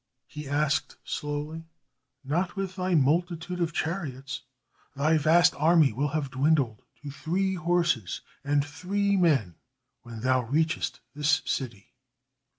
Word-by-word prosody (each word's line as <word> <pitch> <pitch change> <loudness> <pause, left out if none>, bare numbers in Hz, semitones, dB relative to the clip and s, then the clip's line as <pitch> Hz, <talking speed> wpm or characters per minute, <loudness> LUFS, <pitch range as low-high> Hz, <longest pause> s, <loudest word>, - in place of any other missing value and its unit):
he 150 -1 -8
asked, 145 0 0
slowly. 150 +2 -4 0.6
"Not 175 +7 -1
with 195 -2 -3
thy 185 -1 0
multitude 170 +4 +1
of 170 -1 +1
chariots. 140 -7 -3 0.5
Thy 155 +3 +3
vast 170 +4 +5
army 155 -3 +4
will 140 +6 0
have 145 -2 -2
dwindled 130 -4 +1 0.2
to 145 - -6
three 185 +6 -1
horses 170 - 0 0.2
and 145 0 +1
three 200 +7 0
men 135 - +2 0.4
when 115 -2 -9
thou 130 +1 +3
reachest 155 +7 -1
this 145 +1 +2
city." 120 -3 -4
150 Hz, 125 wpm, -27 LUFS, 135-175 Hz, 0.6 s, vast